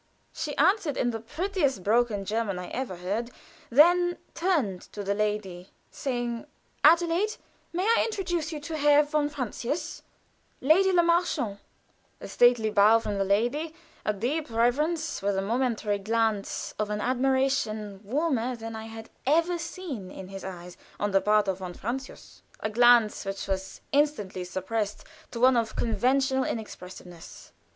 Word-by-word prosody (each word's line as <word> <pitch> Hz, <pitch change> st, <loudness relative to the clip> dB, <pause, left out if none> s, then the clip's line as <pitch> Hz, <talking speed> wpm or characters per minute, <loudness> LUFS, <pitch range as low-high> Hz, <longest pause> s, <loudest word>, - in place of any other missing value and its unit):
She 295 Hz, -2 st, -4 dB
answered 340 Hz, -2 st, +2 dB
in 245 Hz, -, +1 dB
the 225 Hz, -, -4 dB
prettiest 295 Hz, -, -1 dB
broken 215 Hz, -1 st, +1 dB
German 210 Hz, -2 st, -1 dB
I 180 Hz, -, -6 dB
ever 250 Hz, -7 st, -4 dB
heard, 200 Hz, +7 st, -3 dB, 0.4 s
and 240 Hz, -, 0 dB
then 350 Hz, +2 st, +5 dB, 0.2 s
turned 295 Hz, -, 0 dB
to 205 Hz, -, -5 dB
the 200 Hz, +1 st, 0 dB
lady, 200 Hz, -3 st, -2 dB, 0.2 s
saying: 240 Hz, -1 st, -3 dB, 0.4 s
"Adelaide, 340 Hz, +6 st, +4 dB, 0.4 s
may 355 Hz, +2 st, -1 dB
I 460 Hz, +3 st, +4 dB
introduce 350 Hz, -7 st, -2 dB
Herr 295 Hz, -2 st, +2 dB
von 295 Hz, 0 st, 0 dB
Francius 275 Hz, +1 st, -4 dB, 0.6 s
Lady 360 Hz, +8 st, +4 dB
Le 350 Hz, -2 st, +4 dB
Marchant." 335 Hz, -, +1 dB, 0.6 s
A -, -, -8 dB
stately 240 Hz, -3 st, +4 dB
bow 210 Hz, +2 st, +6 dB
from 210 Hz, -3 st, -3 dB
the -, -, +3 dB
lady 245 Hz, +11 st, 0 dB, 0.3 s
a -, -, +1 dB
deep 250 Hz, +10 st, -2 dB
reverence, 300 Hz, +9 st, 0 dB
with 200 Hz, 0 st, 0 dB
a -, -, +1 dB
momentary 225 Hz, -2 st, 0 dB
glance 220 Hz, 0 st, -1 dB
of 210 Hz, -1 st, -1 dB
an 210 Hz, 0 st, -2 dB
admiration 250 Hz, -5 st, 0 dB
warmer 255 Hz, 0 st, 0 dB
than 225 Hz, -1 st, -7 dB
I 220 Hz, 0 st, -6 dB
had 225 Hz, 0 st, -10 dB, 0.2 s
ever 335 Hz, +4 st, +2 dB
seen 315 Hz, -, -6 dB
in 190 Hz, 0 st, -9 dB
his 195 Hz, 0 st, -8 dB
eyes, 180 Hz, -2 st, -8 dB, 0.2 s
on 205 Hz, 0 st, 0 dB
the 195 Hz, 0 st, +3 dB
part 210 Hz, -1 st, +3 dB
of 190 Hz, -1 st, -1 dB
von 180 Hz, -2 st, -6 dB
Francius 255 Hz, +4 st, -6 dB, 0.2 s
a 215 Hz, -, -3 dB
glance 240 Hz, -1 st, +5 dB
which 195 Hz, 0 st, -5 dB
was 190 Hz, 0 st, -4 dB
instantly 275 Hz, -11 st, 0 dB
suppressed 200 Hz, +3 st, -3 dB, 0.3 s
to 235 Hz, -, -6 dB
one 255 Hz, +1 st, +5 dB
of 230 Hz, -2 st, 0 dB
conventional 265 Hz, +3 st, +1 dB
inexpressiveness. 180 Hz, -6 st, -8 dB
235 Hz, 150 wpm, -27 LUFS, 205-295 Hz, 0.6 s, bow